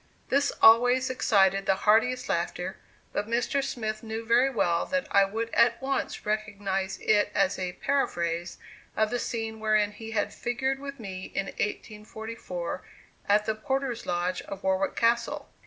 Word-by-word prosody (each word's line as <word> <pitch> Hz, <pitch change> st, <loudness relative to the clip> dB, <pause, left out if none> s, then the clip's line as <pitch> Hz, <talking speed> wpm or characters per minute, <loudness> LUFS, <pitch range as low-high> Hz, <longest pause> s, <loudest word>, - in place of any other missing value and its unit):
This 280 Hz, +1 st, +2 dB
always 245 Hz, +3 st, +6 dB
excited 195 Hz, -5 st, +3 dB
the 195 Hz, -, +4 dB
heartiest 225 Hz, +4 st, +3 dB
laughter; -, -, -2 dB, 0.4 s
but 205 Hz, -, -2 dB
Mr. 245 Hz, +4 st, 0 dB
Smith 215 Hz, -4 st, -3 dB
knew 225 Hz, 0 st, -5 dB
very 240 Hz, +4 st, +4 dB
well 175 Hz, -9 st, +1 dB
that 275 Hz, 0 st, 0 dB
I 200 Hz, 0 st, +5 dB
would 225 Hz, +3 st, -3 dB
at 235 Hz, 0 st, +4 dB
once 270 Hz, 0 st, -2 dB
recognize 200 Hz, -3 st, -2 dB
it 205 Hz, -1 st, +3 dB
as 195 Hz, 0 st, +2 dB
a 180 Hz, -1 st, -3 dB
paraphrase 175 Hz, -12 st, -1 dB, 0.4 s
of 215 Hz, 0 st, +2 dB
the 245 Hz, -, 0 dB
scene 225 Hz, -2 st, -4 dB
wherein 215 Hz, -1 st, +2 dB
he 220 Hz, +2 st, -9 dB
had 215 Hz, -2 st, -1 dB
figured 265 Hz, +3 st, -2 dB
with 275 Hz, -1 st, -7 dB
me 190 Hz, -4 st, -6 dB
in 195 Hz, -, 0 dB
1844 210 Hz, -3 st, -5 dB, 0.5 s
at 210 Hz, +1 st, +4 dB
the 220 Hz, -, +1 dB
porter's 265 Hz, +1 st, -3 dB
lodge 180 Hz, +1 st, -1 dB
of 195 Hz, 0 st, -8 dB
Warwick 190 Hz, 0 st, +1 dB
Castle. 235 Hz, +1 st, +1 dB
220 Hz, 155 wpm, -27 LUFS, 195-240 Hz, 0.5 s, always